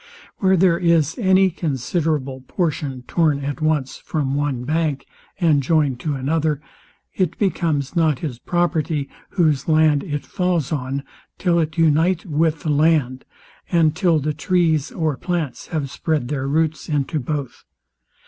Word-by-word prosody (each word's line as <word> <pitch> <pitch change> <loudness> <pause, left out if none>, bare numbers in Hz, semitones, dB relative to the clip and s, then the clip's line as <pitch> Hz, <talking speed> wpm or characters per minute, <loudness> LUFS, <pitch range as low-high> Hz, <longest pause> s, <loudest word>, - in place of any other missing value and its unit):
Where 190 -1 +3
there 175 -1 +4
Is 165 -3 +2
any 190 -2 +4
considerable 145 -3 -2
portion 145 -7 -2
torn 150 -1 +1
at 145 +2 -4
once 155 -4 0
from 140 -4 -2
one 140 -3 -1
bank, 150 -1 -1 0.3
and 160 -5 +3
joined 140 -3 +1
to 150 +2 -2
another, 150 +2 0 0.5
it 185 -3 -1
becomes 160 -7 0
not 160 -5 +2
his 130 -5 -5
property, 160 -4 0 0.2
whose 155 -7 +1
land 155 -2 +4
it 145 -5 -4
falls 180 -6 -1
on, 140 -1 -2 0.3
till 175 -2 +2
it 155 0 -2
unite 165 +3 +3
with 160 -1 0
the 155 - -3
land, 145 -4 +2 0.5
and 160 -3 +3
till 175 -2 +3
the 150 +1 -1
trees 160 -1 +1
or 155 -6 -1
plants 170 -5 -3
have 145 -5 -3
spread 150 -4 -1
their 135 -2 -2
roots 155 +2 0
into 150 +1 0
both. 140 0 -4
155 Hz, 145 wpm, -21 LUFS, 140-165 Hz, 0.5 s, there